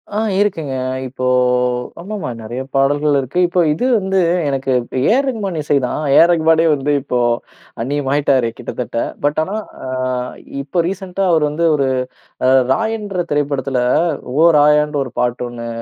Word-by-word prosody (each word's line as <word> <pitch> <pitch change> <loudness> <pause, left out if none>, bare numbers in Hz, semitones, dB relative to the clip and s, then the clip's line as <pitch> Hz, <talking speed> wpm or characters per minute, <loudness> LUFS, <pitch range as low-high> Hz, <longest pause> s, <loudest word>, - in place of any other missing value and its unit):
அ 215 - +1 0.2
இருக்குங்க. 160 -10 -1 0.3
இப்போ 130 0 -5 0.8
ஆமாமா 195 -5 -5
நெறைய 120 +4 -5
பாடல்கள் 145 +2 +2
இருக்கு. 135 +7 -2
இப்போ 175 0 +1
இது 245 - -2
வந்து 190 -1 0 0.3
எனக்கு 135 -1 -2
இப் 120 - -10
ஏ.ஆர் 270 +5 +3
ரகுமான் 200 -10 -2
இசை 145 -1 +1
தான். 125 - -3
ஏ - - +5
ஆர் 175 - +4
ரகுமானே 160 -1 +3
வந்து 145 +1 -2
இப்போ 125 -2 -2 0.6
அந்நியம் 135 +2 -2
ஆயிட்டாரு 140 -4 +2
கிட்டத்தட்ட. 125 -1 -5 0.3
பட் 145 +1 +1
ஆனா, 195 +6 -4 0.3
அ - - -6 0.8
இப்போ 150 +5 0
ரீசென்ட் 190 -1 -6
டா 195 - +3
அவர் 155 -3 +3
வந்து 165 +3 -1
ஒரு 140 -2 +1 0.6
அ - - +5 0.2
ராயன்ற 210 -1 -2
திரைப்படத்துல 140 -3 0 0.6
ஓ - - +5 0.2
ராயானு 150 0 +3
ஒரு 130 - -9
பாட்டு 125 0 0
ஒண்ணு 115 -1 -7
150 Hz, 155 wpm, -17 LUFS, 135-180 Hz, 0.8 s, ஏ